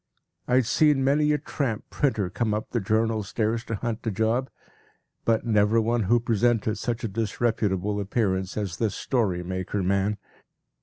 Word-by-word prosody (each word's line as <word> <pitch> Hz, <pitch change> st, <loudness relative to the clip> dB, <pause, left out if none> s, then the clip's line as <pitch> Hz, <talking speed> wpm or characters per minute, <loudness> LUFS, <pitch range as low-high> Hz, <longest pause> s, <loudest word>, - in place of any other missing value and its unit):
I 125 Hz, -, +2 dB
had 130 Hz, -2 st, +4 dB
seen 145 Hz, +2 st, +3 dB
many 150 Hz, +2 st, +3 dB
a 150 Hz, -, +3 dB
tramp 130 Hz, -7 st, -3 dB
printer 110 Hz, -10 st, 0 dB
come 110 Hz, 0 st, 0 dB
up 110 Hz, -, -5 dB
the 120 Hz, -, 0 dB
Journal 110 Hz, +2 st, +1 dB
stairs 110 Hz, +3 st, -1 dB
to 115 Hz, -, -3 dB
hunt 115 Hz, +1 st, -3 dB
a -, -, +3 dB
job, 110 Hz, +5 st, 0 dB, 0.8 s
but 115 Hz, 0 st, +2 dB
never 110 Hz, 0 st, +3 dB
one 115 Hz, -1 st, +1 dB
who 120 Hz, +5 st, +4 dB
presented 115 Hz, -2 st, +1 dB
such 120 Hz, +2 st, -3 dB
a -, -, 0 dB
disreputable 105 Hz, -2 st, -1 dB
appearance 95 Hz, -2 st, -1 dB
as 100 Hz, -6 st, -3 dB
this 105 Hz, -1 st, -1 dB
story 100 Hz, -9 st, 0 dB
maker 95 Hz, +2 st, -3 dB
man. 100 Hz, +2 st, +1 dB
110 Hz, 165 wpm, -26 LUFS, 100-120 Hz, 0.8 s, had